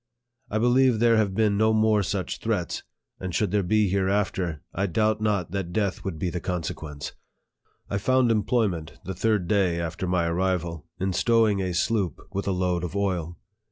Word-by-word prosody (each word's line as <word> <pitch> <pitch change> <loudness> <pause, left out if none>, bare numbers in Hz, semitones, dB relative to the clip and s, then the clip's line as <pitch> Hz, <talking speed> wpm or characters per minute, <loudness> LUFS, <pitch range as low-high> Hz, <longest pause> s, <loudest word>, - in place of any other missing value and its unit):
I 105 - -1
believe 125 +1 +4
there 115 0 +4
have 100 -3 +1
been 105 -2 +2
no 110 0 +4
more 110 -1 +3
such 100 -1 -2
threats, - - -2 0.4
and 90 -3 -4
should 105 -2 +1
there 105 0 +2
be 105 +3 +2
hereafter, 95 -4 0
I 100 +3 0
doubt 110 +4 +1
not 100 -6 0
that 95 -3 -3
death 100 -1 -1
would 95 -5 -4
be 90 +1 -2
the 90 - -3
con 90 0 -2
sequence. 75 -2 -6 0.8
I 100 - -2
found 130 +2 +3
employment, 105 -7 0
the 95 - -3
third 100 -1 +1
day 95 -4 +2
after 85 +2 -3
my 90 -1 +1
arrival, 85 -2 -1
in 95 0 0
stowing 110 -2 +3
a 90 -2 -2
sloop 95 - 0
with 100 +1 -3
a - - +2
load 90 -1 0
of 90 +1 -4
oil. 90 -4 -1
95 Hz, 185 wpm, -26 LUFS, 90-110 Hz, 0.8 s, believe